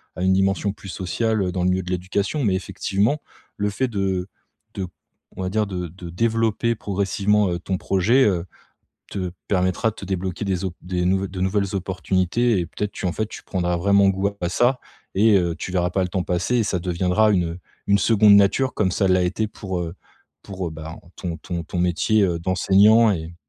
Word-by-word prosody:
à 90 - -4
une 95 0 +4
dimension 95 +1 +1
plus 95 - -11
sociale, 105 +4 -1
heu, 90 - -1
dans 90 - -2
le 90 - +3
milieu 95 0 0
de 90 - -6
l'éducation. 95 - -1
Mais 100 -5 +2
effectivement 100 +7 0 0.4
le 105 0 0
fait 130 +6 -1
de 95 -5 -1 0.5
de 95 -2 -4 0.5
on - - -4
va 90 - -1
dire 105 +2 0
de 90 -2 -4
de 90 +1 -10
développer 115 +4 +1
progressivement, 100 0 +1
heu, 85 - -2
ton 95 +2 -2
projet, 100 +9 +3
heu, 90 -4 +1 0.7
te 95 -3 -3 0.2
permettra 95 +3 +1
de - - -14
te - - -9
débloquer 95 0 -3
des 95 -2 -1
opp 90 -2 -3
des 90 0 -2
nouv 95 +2 +1
de 90 0 -7
nouvelles 100 +1 0
opportunités 95 +5 0
et 85 - -1
peut-être 105 +4 -4
tu - - -4
en 90 - 0
fait 110 - -2
tu - - -9
prendras 90 -2 -1
vraiment 100 +2 +4
goût 95 +1 +1
à 90 - -1
ça 120 +7 +2 0.3
et 105 +1 +5
heu, 85 -2 0
tu - - -5
verras 90 -1 +1
pas 95 +1 0
le 90 - -1
temps 90 0 -2
passer 90 +8 0
et - - +3
ça 95 - -1
deviendra 90 +5 +2
une, 90 -4 +2
heu 85 - -9 0.3
une 100 0 +4
2de 105 -1 +5
nature. 100 +7 +3
Comme 95 -3 +1
ça 95 +1 +1
l'a 90 0 +3
été 95 +5 0
pour, 95 -3 -5
heu 85 -1 -4 0.5
pour, 95 -2 -5
heu, - - -8
ben, 80 +1 -8 0.2
ton 85 -3 -4
ton 85 -2 -4
ton 90 - -5
métier, 90 +5 +2
heu, 85 -3 0
d'enseignant 100 +6 +4
et 85 -2 -5
95 Hz, 210 wpm, -22 LUFS, 90-105 Hz, 0.7 s, et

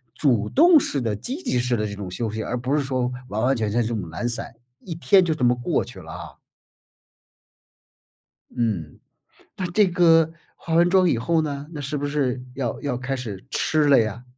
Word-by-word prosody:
主 120 -7 +1
动 330 +2 +6
式 145 - -2
的 115 -3 -1
积 255 - -5
极 125 - 0
式 125 0 0
的 105 -2 -1
这 100 - -4
种 100 -2 -6
休 110 +4 -3
息， 110 +1 -4
而 120 - -3
不 130 +4 -1
是 - - +2
说 130 -2 -1 0.2
完 105 0 -3
完 130 +3 +3
全 110 -2 -1
全 120 +4 +1
这 110 - -1
种 95 -7 -4
懒 100 +9 -3
散， 120 - -6 0.3
一 170 - -7
天 185 +3 +4
就 165 - +1
这 135 - -4
么 120 0 +5
过 125 +6 -1
去 120 -5 -11
了 80 -3 -10
啊。 85 +1 -8 2.3
嗯， 105 - -2 0.6
那 185 - -2
这 205 +2 +4
个 165 -2 +4 0.2
化 165 - -6
完 170 +1 +5
妆 185 0 +4
以 125 - +1
后 160 +7 +1
呢， 145 -2 -4
那 155 - -7
是 145 +2 -3
不 145 - -2
是 135 -3 -1
要 120 -4 -3
要 140 -4 -2
开 135 +1 -3
始 110 -7 -7
吃 155 -1 +1
了 140 -3 +6
呀？ 110 +1 -2
130 Hz, 225 characters per minute, -23 LUFS, 115-160 Hz, 2.3 s, 动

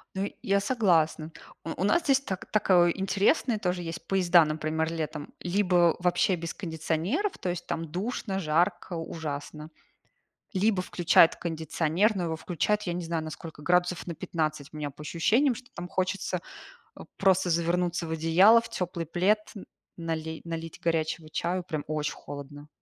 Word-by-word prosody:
Ну 195 +1 -1
я 200 0 +2
согласна. 170 -8 +2 0.3
У 165 +2 -5
у - - +2
нас 270 - +3
здесь 275 -2 +3
так 190 -9 -5
такое 180 -5 +4
интересные 200 - +1
тоже 180 -2 -1
есть 165 0 -7
поезда, 180 -3 +5
например, 155 +1 -1
летом. 155 -2 -5
Либо 180 -2 +3
вообще 180 +1 +2
без 165 0 -5
кондиционеров, 175 - -2
то 180 - -3
есть, 175 0 -4
там 165 -2 -4
душно, 195 +1 -3
жарко, 175 +2 0
ужасно, 155 -2 -5 0.8
либо 195 0 +2
включают 175 -2 +4
кондиционер, 165 +5 0
но 180 - -1
его 165 -1 -1
включают, 180 +6 -1
я 175 - -2
не 175 0 -3
знаю, 165 -1 -2
насколько 155 0 -8
градусов 180 +2 +1
на 170 - -4
15 155 -3 -3
у - - -7
меня 150 -1 -3
по 140 - -13
ощущениям, 230 - +2
что 250 +2 -11
там 175 +1 -6
хочется 185 -1 -2 0.8
просто 190 -2 +3
завернуться 170 +1 0
в - - -5
одеяло, 170 +8 +6
в 230 - -10
теплый 175 -2 -3
плед, 200 +6 +1 0.4
нали 160 -1 -4
налить 165 -1 -6
горячего 160 -1 -1
чаю, 180 +3 -1
прям 155 -5 -3
очень 150 -1 -2
холодно. 145 +1 -9
175 Hz, 155 wpm, -28 LUFS, 160-190 Hz, 0.8 s, одеяло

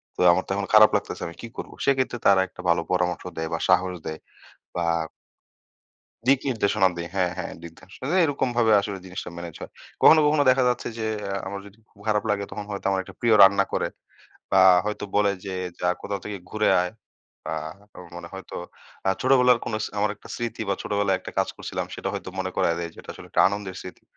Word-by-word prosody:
তো - - -3
আমার 95 +2 +1
তো - - -5
এখন 100 -1 -2
খারাপ 110 0 +9
লাগতেছে, - - -2
আমি 85 - -9
কি 115 - -6
করব?" - - -6
সেক্ষেত্রে, 130 -3 +1
তারা 95 -1 +6
একটা 90 - -12
ভালো 85 - +3
পরামর্শ 90 -1 0
দেয় 80 0 -2
বা 80 - -1
সাহস 90 0 +3
দেয় 80 0 -5 0.6
বা 85 - -1 1.4
দিক 135 +1 +5
নির্দেশনা 105 -4 +2
দেয়। 85 - -4
হ্যাঁ, 90 -2 +1
হ্যাঁ, 90 - -4
দিক 85 - -9
নির্দেশনা 95 +7 -10
দেয়, 185 - +4
এরকমভাবে 120 -6 +1
আসলে 100 -1 -4
জিনিসটা 90 -1 -6
ম্যানেজ 85 -2 -7
হয়। - - -8 0.3
কখনো, 160 - +8
কখনো 150 -1 +3
দেখা 130 0 +4
যাচ্ছে 125 - -2
যে, 110 - -2 0.2
এ্যা 100 0 -3
আমার 100 0 -5
যদি 100 +1 -15
খুব 100 - -25
খারাপ 105 -1 +2
লাগে, 100 -1 +1
তখন 105 0 -6
হয়তো 100 -1 -6
আমার 95 -1 +1
একটা - - -13
প্রিয় 115 -2 +4
রান্না 100 0 +5
করে - - +1 0.6
বা 95 - +5 0.3
হয়তো 105 0 -3
বলে 105 -1 +4
যে, 95 -1 -4 0.3
"যা, 90 - +2
কোথাও 100 -1 -3
থেকে 105 -1 -4
ঘুরে 110 0 +2
আয়।" 90 - -3 0.5
বা 80 +1 -2 0.4
আ - - -8 0.2
মনে 85 0 -7
হয়তো 95 0 -8 0.5
আ - - +5
ছোটবেলার 125 -2 +5
কোনো 110 - -2
স - - -3
আমার 105 0 +2
একটা - - -16
স্মৃতি 120 -1 -4
বা 100 - +2
ছোটবেলায় 100 -2 +1
একটা - - -9
কাজ - - +2
করছিলাম, - - -4
সেটা - - -5
হয়তো - - -5
মনে 95 0 -2
করায় 85 - +2
দেয় 85 - -4
যে, - - -23
এটা - - -8
আসলে - - -12
একটা - - +4
আনন্দের 100 -2 -5
স্মৃতি। 90 - -11
100 Hz, 215 wpm, -25 LUFS, 90-110 Hz, 1.4 s, খারাপ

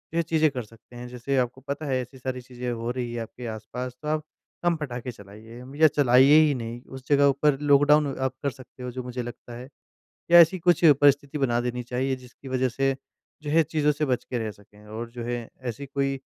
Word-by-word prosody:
यह 170 - +3
चीज़ें 160 -1 +2
कर 125 -3 -4
सकते 115 +2 -18
हैं। 120 0 -7
जैसे 125 +2 -2
आपको 125 +1 -1
पता 140 +3 -5
है 130 -3 0
ऐसी 125 +2 -10
सारी 130 0 -4
चीज़ें 125 0 -6
हो 115 0 -3
रही 120 -2 -4
है 120 - -3
आपके 120 +2 -8
आस-पास 115 +3 -6
तो 150 - -7
आप, 155 0 0 0.4
कम 175 -1 +3
पटाख़े 125 -5 -5
चलाइए 110 +2 -13
अम, 130 +2 -11
या 155 +1 +6
चलाइए 140 +1 +6
ही 145 - +1
नहीं, 120 0 -6
उस 130 0 -11
जगह 145 -1 +5
ऊपर 140 0 +2
लॉकडाउन 145 +1 +5
आप 130 0 -1
कर 140 - +1
सकते 130 -1 -13
है 125 - -4
जो 130 +1 -6
मुझे 125 0 -5
लगता 120 0 -9
है 125 +1 -9 0.6
या 175 - +9
ऐसी 170 +3 +5
कुछ 175 0 +2 0.2
परिस्थिति 145 +1 +3
बना 120 -4 +1
देनी 125 0 -3
चाहिए 130 +2 -2
जिसकी 130 +1 -13
वजह 130 0 +1
से 135 +2 0 0.5
जो 150 - -4
है, 165 +2 +5
चीज़ों 150 -1 +1
से 150 +1 -1
बच 125 -3 -1
के 125 - -3
रह 110 -2 -3
सके 105 +1 -18
और 115 +2 -6
जो 120 0 -7
है 120 -1 -4 0.2
ऐसी 140 +5 -8
कोई 135 0 -2
130 Hz, 230 wpm, -25 LUFS, 120-145 Hz, 0.6 s, या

